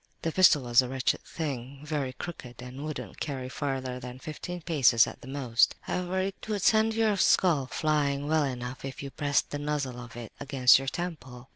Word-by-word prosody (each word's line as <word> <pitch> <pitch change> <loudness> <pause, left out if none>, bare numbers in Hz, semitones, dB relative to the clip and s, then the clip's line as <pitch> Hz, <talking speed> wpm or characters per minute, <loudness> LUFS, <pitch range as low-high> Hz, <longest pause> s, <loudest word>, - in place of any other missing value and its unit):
"The 165 - 0
pistol 170 -5 +5
was 120 +1 +5
a 125 - -5
wretched 130 0 0
thing, 135 -3 -5
very 145 -4 -2
crooked 125 -5 -8
and 125 +3 -8
wouldn't 155 -1 -6
carry 130 -4 -4
farther 130 -2 -3
than 125 0 -8
fifteen 160 +6 -6
paces 135 -8 +5
at - - -9
the - - -11
most. 130 -4 +2
However, 180 +1 -2
it 190 +1 -4
would 205 -3 -1
send 220 0 +4
your 220 -2 +2
skull 160 -9 +3
flying 145 -1 0
well 155 0 +3
enough 125 -2 -4
if 135 +1 -6
you 140 - -6
pressed 145 +2 0
the 145 - -3
muzzle 145 -4 -2
of 120 -1 -10
it 120 -3 -8
against 135 -3 +5
your 135 - -6
temple. 135 -7 -5
140 Hz, 190 wpm, -28 LUFS, 125-155 Hz, -, pistol